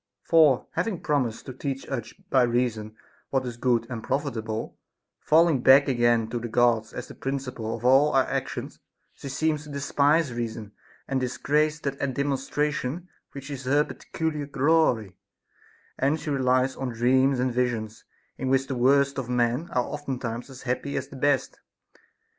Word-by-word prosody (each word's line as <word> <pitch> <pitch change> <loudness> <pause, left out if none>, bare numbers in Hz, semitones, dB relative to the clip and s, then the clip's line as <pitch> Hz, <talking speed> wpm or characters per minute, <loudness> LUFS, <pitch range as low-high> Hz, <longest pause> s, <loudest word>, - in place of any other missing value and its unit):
For 155 -6 +4
having 180 +1 -2
promised 140 -7 -1
to 130 - -7
teach 135 +1 -5
us 125 -5 -4 0.2
by 130 - +5
reason 120 -3 0 0.3
what 135 -1 0
is 120 -1 -5
good 120 -1 +1
and 115 -3 -6
profitable, 115 -6 -3 0.4
falling 160 -4 +4
back 135 +3 +7
again 120 -3 +2
to 120 - -2
the 120 - -5
Gods 115 -1 +2
as 125 - -7
the - - -10
princi 135 -1 -4
ple 110 -1 -4
of 115 - -9
all 135 +4 +5
our 135 -1 +5
actions, - - -4 0.3
she 140 - -9
seems 150 +2 0
to 150 - -12
despise 140 +1 +1
reason, 115 -3 -5 0.4
and 135 - 0
dis 125 -1 -3
grace 150 +1 +1
that 140 -1 -3 0.2
demonstration 145 +3 -2 0.2
which 140 +1 -8
is 135 -2 -6
her 145 +3 +3
peculiar 150 -2 -4
glory; 135 - +2 0.8
and 140 +4 +1
she 150 - -4
relies 130 -1 +2
on 135 -1 -3
dreams 130 +3 +2
and 125 -1 0
visions, 115 -3 -2 0.4
in 130 - -2
which 135 0 +2
the 135 - -4
worst 140 +2 +3
of 125 -2 -5
men 125 +6 0
are 125 - +1
oftentimes 130 -5 -5
as 135 -1 -11
happy 130 +2 -2
as 135 - -4
the - - -11
best. 140 0 0
130 Hz, 165 wpm, -26 LUFS, 120-140 Hz, 0.8 s, back